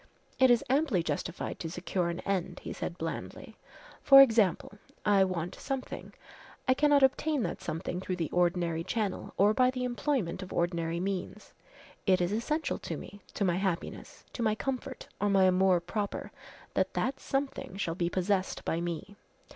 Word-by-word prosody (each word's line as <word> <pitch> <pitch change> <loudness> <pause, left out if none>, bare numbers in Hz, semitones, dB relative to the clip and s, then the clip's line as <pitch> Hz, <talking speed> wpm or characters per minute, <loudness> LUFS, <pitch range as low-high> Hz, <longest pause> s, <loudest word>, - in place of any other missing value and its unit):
"It 260 -1 +6
is 240 0 +4
amply 265 - +2
justified 160 +2 -3
to 165 - -4
secure 175 +1 -2
an 170 +1 -4
end," 185 -2 -2
he - - -5
said 170 - -5
blandly. 165 -1 -6 0.5
"For 275 -1 +9
example 220 -6 +4 0.3
I 200 -2 +5
want 180 -2 -2
something 270 -2 -5 0.5
I 260 - +6
cannot 290 0 +4
obtain 285 +1 +2
that - - -3
something 170 +3 -4
through 185 -1 -2
the 165 -4 -3
ordinary 175 -2 +1
channel 205 +2 -3
or 205 +2 +5
by 255 +2 +4
the 255 -1 -3
employment 245 - -1
of 185 - -8
ordinary 170 -1 -1
means. 190 0 -4 0.5
It 185 -1 +5
is 175 +1 0
essential 300 +9 -1
to - - -5
me, 205 - -10
to 200 - +1
my 175 -1 +2
happiness, 190 -3 -3
to - - -5
my 215 -2 +2
comfort, 265 +1 -4
or 205 - +1
my 195 -1 +4
amour 185 -1 +4
propre, 200 +4 -4 0.4
that - - 0
that 265 - -1
something 270 -8 -3
shall 170 -4 -1
be 170 0 -1
possessed 185 +1 -1
by 165 - 0
me. 175 +3 -5
195 Hz, 170 wpm, -30 LUFS, 175-250 Hz, 0.5 s, For